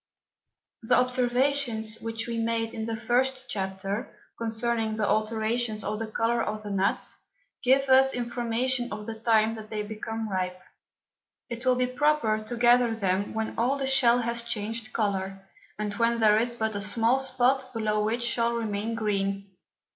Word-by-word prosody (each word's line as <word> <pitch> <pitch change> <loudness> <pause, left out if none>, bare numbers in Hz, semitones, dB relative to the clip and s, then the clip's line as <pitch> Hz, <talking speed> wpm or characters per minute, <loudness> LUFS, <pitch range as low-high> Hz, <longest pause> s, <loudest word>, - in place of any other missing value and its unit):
The 235 +2 +2
Observations 250 -2 +2
which 225 0 -4
we 230 -1 -2
made 225 0 -1
in 220 0 -4
the 225 - -2
first 255 +3 0
Chapter, 195 0 -3 0.2
concerning 225 -1 -1
the 215 -2 0
Alterations 220 0 0
of 210 0 -3
the 225 - -3
Colour 230 +2 0
of 215 -1 -3
the 205 - -5
Nuts, 195 0 0 0.4
give 270 +2 +4
us 265 0 +6
information 240 +1 -1
of 210 0 -6
the 225 - -4
time 220 0 +2
that 220 -1 -9
they 210 -1 -3
become 220 +1 -5
ripe. 185 -2 -2 0.9
It 235 +2 -4
will 255 - +5
be 250 0 +1
proper 255 -5 +1
to 235 +2 -6
gather 240 -1 +4
them 200 -1 -1
when 220 0 -2
all 255 +4 +2
the 275 - -2
Shell 245 -2 +4
has 235 0 -1
changed 225 -1 -4
Colour, 195 -2 -2 0.3
and 210 -1 -3
when 230 +2 +1
there 215 -1 +5
is 235 +1 -1
but 220 -2 -1
a 200 - -3
small 225 +5 +2
Spot 260 0 +1
below 215 -3 0
which 230 +3 -1
shall 235 0 +1
remain 220 0 -2
green. 200 -2 -2
225 Hz, 165 wpm, -27 LUFS, 215-240 Hz, 0.9 s, us